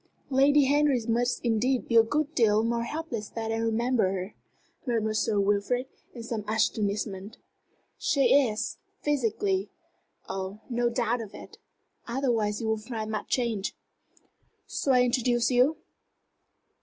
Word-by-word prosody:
"Lady 280 Hz, +2 st, +5 dB
Henry 285 Hz, -1 st, +3 dB
must 240 Hz, +2 st, +1 dB
indeed 240 Hz, +3 st, +1 dB
be 230 Hz, -, -1 dB
a 225 Hz, -, +9 dB
good 295 Hz, +6 st, -1 dB
deal 220 Hz, -5 st, +3 dB
more 235 Hz, 0 st, 0 dB
helpless 240 Hz, -7 st, -5 dB
that 225 Hz, -1 st, -4 dB
I 225 Hz, -, -1 dB
remember 225 Hz, -2 st, +1 dB
her," 190 Hz, +1 st, -5 dB, 0.5 s
murmured 220 Hz, -3 st, 0 dB
Sir 215 Hz, -2 st, +1 dB
Wilfrid, 205 Hz, +5 st, +1 dB, 0.3 s
in 235 Hz, -, -7 dB
some 230 Hz, -2 st, -4 dB
astonishment. 210 Hz, -2 st, -1 dB, 0.6 s
"She 280 Hz, -, +1 dB
is, 240 Hz, -4 st, +1 dB, 0.2 s
physically. 295 Hz, -, 0 dB, 0.6 s
Oh, 190 Hz, +2 st, -5 dB
no 240 Hz, 0 st, +1 dB
doubt 235 Hz, 0 st, 0 dB
of 215 Hz, -3 st, -9 dB
it! -, -, -12 dB, 0.5 s
Otherwise 235 Hz, -5 st, 0 dB
you 220 Hz, -, -2 dB
won't 220 Hz, -1 st, 0 dB
find 220 Hz, -1 st, -5 dB
much 215 Hz, -, -4 dB
change. 230 Hz, -6 st, -1 dB, 0.9 s
Shall 270 Hz, -, 0 dB
I 250 Hz, -, +5 dB
introduce 245 Hz, -1 st, +1 dB
you?" 255 Hz, +5 st, +3 dB
235 Hz, 135 wpm, -27 LUFS, 215-255 Hz, 0.9 s, a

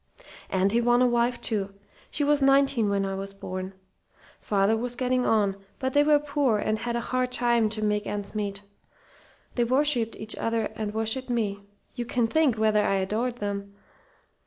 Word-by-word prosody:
"And 190 Hz, +1 st, +1 dB
he 235 Hz, +2 st, +2 dB
won 240 Hz, +1 st, +4 dB
a -, -, +5 dB
wife, 240 Hz, 0 st, +1 dB
too. 200 Hz, -3 st, -3 dB, 0.3 s
She 295 Hz, -, 0 dB
was 290 Hz, 0 st, +3 dB
nineteen 270 Hz, -5 st, +4 dB
when 200 Hz, -1 st, 0 dB
I 195 Hz, -, -3 dB
was 195 Hz, +1 st, -6 dB
born. 185 Hz, 0 st, -6 dB, 0.6 s
Father 200 Hz, +1 st, +2 dB
was 245 Hz, +2 st, -2 dB
getting 255 Hz, 0 st, 0 dB
on, 205 Hz, -3 st, +2 dB, 0.2 s
but 260 Hz, -1 st, -2 dB
they 290 Hz, -, +5 dB
were 300 Hz, 0 st, +5 dB
poor 285 Hz, -5 st, +1 dB
and 215 Hz, +1 st, -1 dB
had 235 Hz, -1 st, -3 dB
a -, -, 0 dB
hard 255 Hz, 0 st, 0 dB
time 235 Hz, -3 st, +2 dB
to 215 Hz, 0 st, -2 dB
make 210 Hz, 0 st, 0 dB
ends 205 Hz, -1 st, -4 dB
meet. 200 Hz, -2 st, -3 dB, 0.9 s
They 240 Hz, -, +1 dB
worshipped 255 Hz, -2 st, +1 dB
each 215 Hz, 0 st, -2 dB
other 225 Hz, -1 st, -1 dB
and 215 Hz, -1 st, -4 dB
worshipped 225 Hz, +4 st, -2 dB
me. 200 Hz, -4 st, -2 dB, 0.3 s
You 240 Hz, -2 st, -4 dB
can 240 Hz, 0 st, +1 dB
think 270 Hz, 0 st, +2 dB
whether 215 Hz, -1 st, +3 dB
I 195 Hz, -, +1 dB
adored 215 Hz, +6 st, -1 dB
them! 200 Hz, -2 st, -5 dB
225 Hz, 185 wpm, -26 LUFS, 205-250 Hz, 0.9 s, a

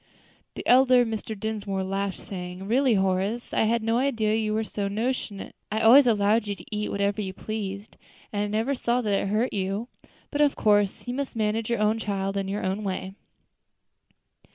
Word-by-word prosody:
The -, -, -7 dB
elder 255 Hz, -1 st, +6 dB
Mr. 220 Hz, -1 st, -5 dB
Dinsmore 205 Hz, -3 st, -3 dB
laughed, 195 Hz, 0 st, -2 dB
saying, 180 Hz, 0 st, -7 dB
"Really, 250 Hz, +1 st, +3 dB
Horace, 195 Hz, +4 st, 0 dB
I -, -, +3 dB
had 230 Hz, +1 st, +1 dB
no 225 Hz, +2 st, +1 dB
idea 230 Hz, -6 st, +1 dB
you 220 Hz, -1 st, 0 dB
were 220 Hz, +1 st, 0 dB
so 205 Hz, -2 st, -3 dB
notionate. 220 Hz, -1 st, -3 dB, 0.2 s
I 220 Hz, -, 0 dB
always 250 Hz, +4 st, +8 dB
allowed 215 Hz, 0 st, +3 dB
you 200 Hz, -, -2 dB
to 210 Hz, -, -9 dB
eat 210 Hz, 0 st, -2 dB
whatever 200 Hz, +1 st, 0 dB
you 190 Hz, -2 st, -4 dB
pleased, 205 Hz, 0 st, -6 dB, 0.4 s
and 205 Hz, -, 0 dB
I 205 Hz, -, 0 dB
never 220 Hz, +6 st, 0 dB
saw 245 Hz, -1 st, 0 dB
that 210 Hz, -4 st, -1 dB
it 200 Hz, -, +1 dB
hurt 215 Hz, +5 st, 0 dB
you. 200 Hz, +4 st, -2 dB, 0.4 s
But, 290 Hz, -, 0 dB
of 290 Hz, -1 st, +3 dB
course, 205 Hz, +1 st, +2 dB
you 245 Hz, -, -2 dB
must 275 Hz, -1 st, -4 dB
manage 220 Hz, 0 st, -1 dB
your 235 Hz, -, +1 dB
own 215 Hz, +1 st, +2 dB
child 195 Hz, -2 st, -2 dB
in 195 Hz, -1 st, -1 dB
your 200 Hz, +2 st, -3 dB
own 190 Hz, +3 st, -2 dB
way." 190 Hz, -1 st, -4 dB
215 Hz, 190 wpm, -26 LUFS, 200-230 Hz, 0.4 s, always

